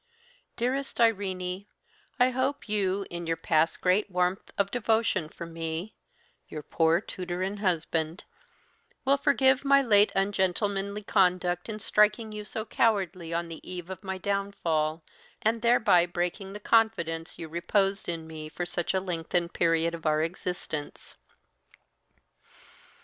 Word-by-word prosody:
"Dearest 265 +3 -2
Irene, 195 -4 0 0.5
I 250 +1 +5
hope 260 +2 -1
you, 200 -2 0
in 175 -1 -5
your 165 0 0
past 160 0 +1
great 190 +3 +2
warmth 180 +1 0
of 200 0 +1
devotion 220 -8 +1
for 170 - -8
me 165 +4 -5 0.5
(your 150 - -7
poor 165 +2 +2
tutor 180 -2 -5
and 200 +2 -3
husband), 165 -3 -1 0.8
will 275 +1 +5
forgive 265 -1 +3
my 275 0 +5
late 210 -4 +5
ungentlemanly 200 +1 0
conduct 180 -1 +1
in 215 - -4
striking 215 +1 +2
you 210 0 -6
so 215 +2 -5
cowardly 190 -8 0
on 170 0 -1
the 165 -1 -9
eve 180 0 -7
of 190 - -8
my 190 -1 -3
downfall, 170 -6 -1 0.4
and 225 +1 +1
thereby 215 -7 +4
breaking 180 +3 -3
the 205 - -7
confidence 175 -8 +1
you 165 - -6
reposed 195 +5 0
in 165 -2 -4
me 155 -1 -8
for 175 - -4
such 175 +1 -2
a - - +3
lengthened 175 -1 -2
period 165 0 +2
of 165 -1 -4
our 155 0 +3
existence. 165 -3 -5
185 Hz, 140 wpm, -28 LUFS, 170-210 Hz, 0.8 s, I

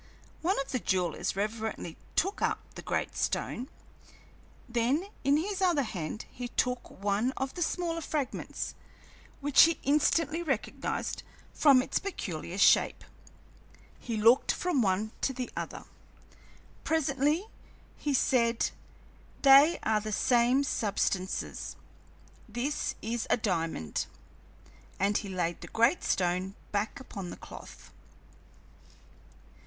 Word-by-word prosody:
One 365 +1 +1
of 275 - -7
the 255 - 0
jewelers 180 -6 0
reverently 215 -4 -3 0.2
took 390 +4 +1
up - - +2 0.2
the - - -8
great - - -2
stone; 255 +4 -2 1.0
then 245 +8 +1 0.2
in 280 +2 +4
his 390 +4 -2
other 345 -6 +3
hand 190 -2 -5
he 245 0 -5
took 250 +1 -1
one 205 +6 0
of 265 0 -2
the 355 - -6
smaller 335 0 -1
fragments, 295 -4 -3 0.7
which 285 -1 +6
he 330 0 +6
instantly 305 +2 +2
recognized 270 -10 -2 0.3
from 275 -4 +6
its - - -1
peculiar 180 - -5
shape. 200 - +4 1.0
He 230 -2 -3
looked 230 +4 +5
from 350 -7 0
one 205 +1 +1
to 265 - +1
the 250 -1 -4
other; - - -5 1.0
presently 300 +2 +1 0.5
he 290 -2 -1
said: 235 -2 +2 0.7
"They 280 +4 +8
are 215 -1 +2
the 215 +1 -4
same 245 +5 +3
substances. 195 -6 -1 0.7
This 245 +7 -2
is 230 +1 -2
a - - +4
diamond." 165 - -1 0.9
And 200 +1 +2
he 200 - -7
laid 175 -2 -2
the - - -8
great 235 +9 +2
stone 185 +2 0 0.2
back 210 +4 -1
upon 195 -8 -7
the - - -8
cloth. - - -12
245 Hz, 120 wpm, -30 LUFS, 205-290 Hz, 1.0 s, They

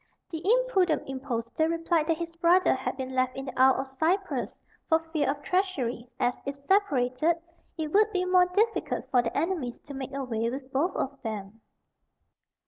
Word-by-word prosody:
The 320 -2 -4
impudent 405 -7 +2
impostor 260 +2 -2
replied 330 -1 +1
that 330 -1 +2
his 335 0 -5
brother 345 +2 +4
had 260 0 -3
been 260 -1 -4
left 255 0 +1
in 270 - -4
the 260 -2 -7
Isle 265 0 +5
of 265 0 -11
Cyprus, 375 +5 +1 0.4
for 320 - +6
fear 320 -4 -2
of 290 +1 -2
treachery, 265 - -1
as, 245 0 +2
if 275 0 -4
separated, 305 -6 +2 0.4
it 310 -1 -3
would 430 +1 +4
be 365 -3 0
more 365 0 +5
difficult 430 +5 0
for 250 - +5
their 230 -1 -3
enemies 310 -6 -1
to 285 - -10
make 270 -1 -5
away 230 -4 -1
with 265 +1 -7
both 310 +8 +1
of 275 +1 -3
them. 215 0 -6
290 Hz, 175 wpm, -28 LUFS, 255-355 Hz, 0.4 s, for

